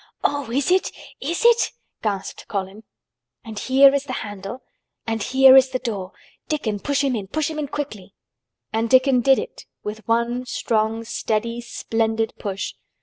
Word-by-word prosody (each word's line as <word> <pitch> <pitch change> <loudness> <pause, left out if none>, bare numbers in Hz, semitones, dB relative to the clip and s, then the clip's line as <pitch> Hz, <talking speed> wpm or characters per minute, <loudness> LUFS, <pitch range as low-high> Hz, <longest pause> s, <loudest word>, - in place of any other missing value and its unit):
"Oh! 285 -4 0
is 275 +7 0
it—is 345 - -2
it!" 475 0 +5 0.3
gasped 200 -3 -3
Colin. 200 +2 -5 0.6
"And 220 -2 -6
here 270 +1 +6
is 280 0 0
the 260 - -5
handle, 205 +4 -7 0.4
and 225 -1 -2
here 265 +3 +7
is 265 0 +7
the 255 - -1
door. 205 -7 -4 0.4
Dickon 230 -10 -2
push 285 +5 0
him 270 -3 +1
in—push 235 +10 -2
him 310 - -5
in 295 - -2
quickly!" 215 -10 -6 0.6
And 225 +1 0
Dickon 260 0 +5
did 270 +2 +5
it 485 - -6 0.2
with 210 +1 -6
one 235 +2 0
strong, 225 -1 0
steady, 230 +1 -2
splendid 225 -1 -1
push. 195 -2 -4
235 Hz, 150 wpm, -22 LUFS, 215-275 Hz, 0.6 s, here